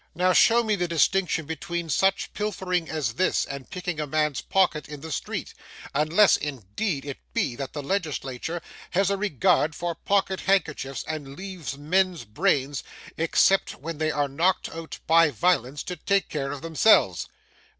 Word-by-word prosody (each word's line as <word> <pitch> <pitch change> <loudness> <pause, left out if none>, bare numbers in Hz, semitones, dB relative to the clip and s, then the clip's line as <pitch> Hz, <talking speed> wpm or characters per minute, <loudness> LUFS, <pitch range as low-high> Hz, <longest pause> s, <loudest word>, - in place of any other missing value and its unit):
Now, 180 +2 +3
show 235 +4 +5
me 215 -2 +1
the 175 -2 -1
distinction 170 0 +1
between 170 +2 -4
such 190 +6 +1
pilfering 185 -5 -2
as 150 -7 -2
this, 185 +9 +1
and 140 -1 -8
picking 180 -3 -4
a 150 - -2
man's 150 -2 0
pocket 175 -6 +1
in 150 -2 -8
the 160 +1 -7
street: - - -4 0.4
unless, 155 +8 +4
indeed, 140 - -3
it 140 -2 -6 0.2
be, 125 - 0
that 135 -2 -5
the 145 - -5
legislature 160 -2 -3 0.3
has 195 +2 +2
a - - +2
regard 180 -5 +2
for 175 -1 -2
pocket 195 +2 0
handkerchiefs, 150 -9 0
and 145 -3 -5
leaves 185 -7 -6
men's 180 +1 +1
brains, 140 - 0 0.3
except 165 +4 +3
when 160 +1 -7
they 155 0 +1
are 145 -2 0
knocked 170 +7 +1
out 165 -1 -7
by 165 -1 +5
violence, 140 - +1
to 180 - -5
take 195 +4 0
care 140 -2 -3
of 145 - -7
themselves. 165 +7 +3
160 Hz, 160 wpm, -25 LUFS, 145-185 Hz, 0.4 s, show